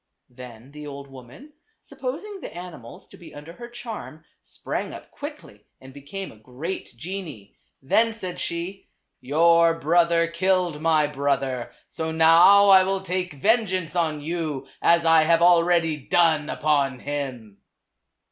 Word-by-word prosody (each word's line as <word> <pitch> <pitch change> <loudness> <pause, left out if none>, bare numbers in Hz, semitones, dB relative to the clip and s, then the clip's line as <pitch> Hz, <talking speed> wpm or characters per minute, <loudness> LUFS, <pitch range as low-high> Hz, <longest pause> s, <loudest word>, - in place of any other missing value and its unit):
Then 125 0 -12
the 150 0 -10
old 140 -1 -9
woman, 135 - -14 0.3
supposing 340 +10 -7
the - - -8
animals 170 -10 -11
to - - -15
be 170 - -14
under 150 +3 -10
her 240 +5 -10
charm, 225 -9 -9 0.2
sprang - - -6
up - - -13
quickly - - -10
and 130 0 -14
became 145 +8 -8
a - - -17
great 130 - -7
genie. 160 - -8 0.3
Then 225 +12 +2
said 185 -5 -7
she 175 +3 -5 0.3
"Your 165 +4 +3
brother 170 +2 +3
killed 175 -2 0
my 160 -2 +3
brother, 135 -3 -2 0.2
so 160 -1 -4
now 165 +5 +6
I 190 -1 +8
will 195 0 -1
take 185 -2 -3
vengeance 185 - 0
on 160 -4 -1
you, 155 -4 -4
as 170 0 +3
I 165 -1 +6
have 165 +1 +3
already 170 -2 +3
done 155 +1 +1
upon 140 -4 0
him." 130 -8 -6
165 Hz, 140 wpm, -24 LUFS, 145-180 Hz, 0.3 s, I